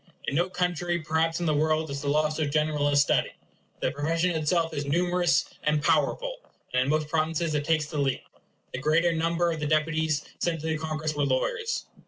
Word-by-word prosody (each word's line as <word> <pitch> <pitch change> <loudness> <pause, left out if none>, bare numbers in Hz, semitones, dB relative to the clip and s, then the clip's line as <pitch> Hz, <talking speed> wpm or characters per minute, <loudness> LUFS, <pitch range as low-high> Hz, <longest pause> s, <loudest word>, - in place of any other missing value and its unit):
In - - -2
no 175 +5 +1
country 175 -1 -1
perhaps 160 +1 0
in 175 - -2
the 155 - +2
world 155 0 +1
is 140 0 -4
the 145 - -2
law 155 +1 +3
so 155 0 -2
general 150 0 +1
a 145 - +2
study. 145 0 +2 0.5
The - - +1
profession 165 +5 0
itself 165 +1 0
is 145 - -2
numerous 175 +2 +2 0.2
and 150 0 +1
powerful; 165 - +1 0.4
and 125 - +3
in - - -2
most 155 0 +1
provinces 160 +1 0
it 145 -1 -1
takes 155 -1 +2
the 150 0 -4
lead. 135 -2 0 0.5
The 125 - -3
greater 165 +5 +2
number 170 +1 +1
of 160 - -3
the 150 - -2
deputies 155 0 +1
sent 165 -3 -1
to - - -7
the 160 -1 0
Congress 155 -1 -2
were 145 -1 0
lawyers. 455 - -1
155 Hz, 205 wpm, -27 LUFS, 150-165 Hz, 0.5 s, law